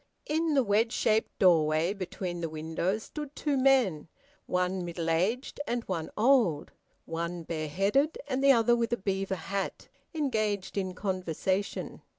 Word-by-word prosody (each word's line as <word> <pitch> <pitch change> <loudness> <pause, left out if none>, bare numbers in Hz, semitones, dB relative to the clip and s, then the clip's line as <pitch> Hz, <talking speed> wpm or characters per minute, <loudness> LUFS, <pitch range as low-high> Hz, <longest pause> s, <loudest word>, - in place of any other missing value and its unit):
In 315 0 0
the 270 - +4
wedge 220 +2 +2
shaped 220 -2 +1
doorway 165 -1 +4
between 185 -2 -5
the 165 - -2
windows 165 +7 -2
stood 295 -1 -7
two 295 -2 0
men, 255 - +3 0.4
one 180 0 0
middle 170 -1 -2
aged 210 - 0
and 240 0 -1
one 170 -6 -3
old, 220 - +3 0.3
one 170 +1 -4
bareheaded 195 - 0
and 270 -1 -1
the 275 - +7
other 240 -1 +4
with 235 -1 -1
a 235 - +1
beaver 195 -1 -1
hat, 195 +3 -4 0.3
engaged 215 -10 -1
in 185 -2 -2
conversation. 185 0 -2
195 Hz, 145 wpm, -29 LUFS, 170-240 Hz, 0.4 s, the